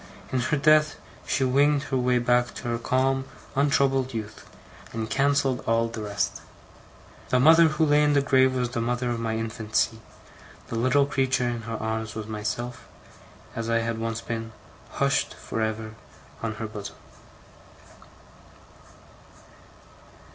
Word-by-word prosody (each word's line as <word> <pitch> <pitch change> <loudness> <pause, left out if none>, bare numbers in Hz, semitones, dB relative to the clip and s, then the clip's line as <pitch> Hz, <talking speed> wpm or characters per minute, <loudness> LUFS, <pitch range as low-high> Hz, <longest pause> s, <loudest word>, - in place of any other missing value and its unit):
In 130 - +1
her 130 +5 0
death 155 +1 +4 0.3
she 135 - +1
winged 140 +2 +3
her 135 - -2
way 125 0 +2
back 120 0 +1
to - - -8
her 115 0 -1
calm 130 +2 +1 0.3
untroubled 135 -2 +2
youth, 110 -2 -7 0.4
and 110 -1 -3
cancelled 135 +1 +1
all 115 0 +2
the 115 -1 -6
rest. 100 -1 -2 0.9
The 125 - +3
mother 160 +5 +7
who 155 0 +1
lay 150 0 +4
in 145 0 +3
the 140 - +4
grave, 130 -1 +3
was 125 -1 -1
the 115 - -2
mother 120 +1 -1
of 120 - -2
my 110 -1 -2
infancy; 110 0 -1 0.7
the - - -4
little 130 +4 +3
creature 130 -2 0
in 120 -1 -3
her 115 - -3
arms, 110 0 -3
was 110 -1 -4
myself, 110 +3 -4 0.7
as 115 0 -3
I 115 0 +2
had 115 0 -2
once 115 0 -3
been, 115 -1 -5 0.4
hushed - - 0
for 115 - -5
ever 110 0 -3 0.5
on 110 -1 -3
her 110 - -5
bosom. 105 -2 -7
120 Hz, 145 wpm, -26 LUFS, 115-135 Hz, 0.9 s, mother